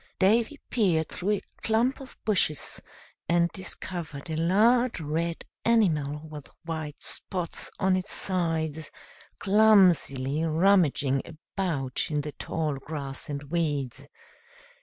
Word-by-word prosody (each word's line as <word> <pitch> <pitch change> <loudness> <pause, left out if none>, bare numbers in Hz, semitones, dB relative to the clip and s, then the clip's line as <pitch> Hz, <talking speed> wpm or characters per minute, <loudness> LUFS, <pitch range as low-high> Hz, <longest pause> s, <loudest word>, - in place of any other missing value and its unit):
Davy 225 +9 +2
peered 180 -9 +2
through 200 +4 -1
a 205 - -1 0.2
clump 235 +4 +1
of 270 -1 -11
bushes, 185 -8 +1 0.5
and 170 0 +3
discovered 170 -5 -5
a - - -1
large 220 +9 +3
red 165 +2 -2 0.2
animal, 155 -10 +2
with 150 -2 -10 0.2
white 160 -2 -5
spots 180 -4 -2
on 190 0 +2
its 185 +1 -2
sides, 160 -4 -1 0.5
clumsily 180 -10 +4
rummaging 160 -5 +3
about 160 -4 -3
in 150 -2 0
the 150 +1 -5
tall 150 -1 -3
grass 140 -2 -6
and 145 0 -4
weeds. 145 -7 -1
165 Hz, 115 wpm, -27 LUFS, 150-195 Hz, 0.5 s, clumsily